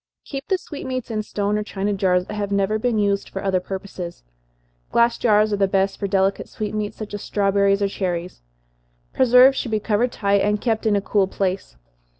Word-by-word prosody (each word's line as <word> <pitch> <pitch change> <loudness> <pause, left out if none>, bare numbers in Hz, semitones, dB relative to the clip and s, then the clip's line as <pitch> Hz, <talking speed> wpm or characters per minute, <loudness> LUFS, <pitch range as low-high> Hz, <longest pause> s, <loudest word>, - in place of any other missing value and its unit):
Keep 275 -1 -6
the 380 - +2
sweetmeats 260 -8 -6
in 215 -1 -1
stone 210 0 -1
or - - -2
china 205 0 -2
jars, 180 -2 +1
that 210 - -7
have 205 -1 -3
never 200 +2 +1
been 235 0 0
used 200 -1 0
for 195 - -6
other 190 -2 +1
purposes. 185 - -7 0.7
Glass 235 0 +3
jars 215 -2 +3
are - - +1
the 195 -1 +2
best 195 0 0
for 200 - -1
delicate 195 0 0
sweetmeats, 210 -1 -4
such 215 -2 -7
as 205 - -4
strawberries 200 0 +1
or - - +3
cherries. 180 - -4 0.7
Preserves 255 +1 +6
should 245 - -3
be 215 -1 0
covered 225 +3 0
tight, 200 -3 +1
and 210 0 +1
kept 225 0 0
in 210 - +3
a 200 - +1
cool 195 0 +1
place. 190 - -3
205 Hz, 195 wpm, -22 LUFS, 195-215 Hz, 0.7 s, Preserves